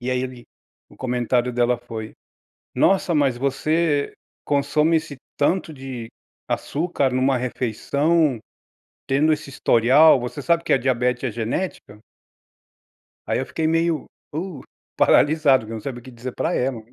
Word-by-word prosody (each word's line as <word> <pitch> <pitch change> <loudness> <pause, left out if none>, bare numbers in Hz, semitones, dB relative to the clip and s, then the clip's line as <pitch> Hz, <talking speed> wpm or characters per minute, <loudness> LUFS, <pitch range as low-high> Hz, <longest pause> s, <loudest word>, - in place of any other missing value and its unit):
E 125 +1 -3
aí 125 - 0
ele 125 -2 -7 0.5
o - - -17
comentário 125 0 0
dela 120 0 +1
foi: 110 -1 -7 0.6
"Nossa, 190 -2 +3
mas 140 -5 +2
você 145 +2 0 0.3
consome 150 +3 +2
esse 155 -2 -6 0.2
tanto 165 +3 +1
de 130 -4 -7 0.4
açúcar 145 -4 -1
numa 130 +1 +2
refeição, 135 +4 0 0.7
tendo 145 +4 +3
esse 150 -1 -3
historial, 130 +4 +5
você 125 +4 -5
sabe 170 +2 +2
que - - +1
a - - +5
diabete 125 0 0
é 125 - -1
genética?". 115 - -4 1.3
Aí - - 0
eu 130 - -2
fiquei 160 - -2
meio, 165 -1 +1 0.3
uh, 165 -3 -4 0.4
paralisado, 145 -5 +4
não 110 0 -6
sabia 120 +1 -6
o - - -20
que 130 - -11
dizer 120 +1 -7
para - - -1
ela. 125 -1 -1
135 Hz, 140 wpm, -22 LUFS, 125-155 Hz, 1.3 s, historial